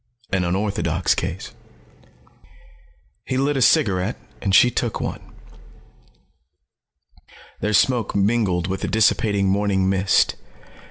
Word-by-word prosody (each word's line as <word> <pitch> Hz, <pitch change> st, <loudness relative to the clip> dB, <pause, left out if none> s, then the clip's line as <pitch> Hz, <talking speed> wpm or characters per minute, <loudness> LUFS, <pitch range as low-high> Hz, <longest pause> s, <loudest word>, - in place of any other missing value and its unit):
An 95 Hz, -2 st, 0 dB
unorthodox 90 Hz, -2 st, -1 dB
case." -, -, -5 dB, 1.7 s
He 130 Hz, -, -3 dB
lit 140 Hz, +2 st, 0 dB
a 135 Hz, -, -1 dB
cigarette, 100 Hz, -2 st, +2 dB, 0.2 s
and 95 Hz, -1 st, +1 dB
she 125 Hz, +5 st, +6 dB
took 120 Hz, -1 st, -2 dB
one. -, -, -4 dB, 2.4 s
Their 105 Hz, -, -2 dB
smoke 120 Hz, +2 st, +1 dB
mingled 100 Hz, -4 st, +1 dB
with 95 Hz, +1 st, -4 dB
the -, -, -2 dB
dissipating 105 Hz, -2 st, +1 dB
morning 95 Hz, -1 st, +1 dB
mist. 95 Hz, 0 st, +2 dB
100 Hz, 105 wpm, -21 LUFS, 95-110 Hz, 2.4 s, she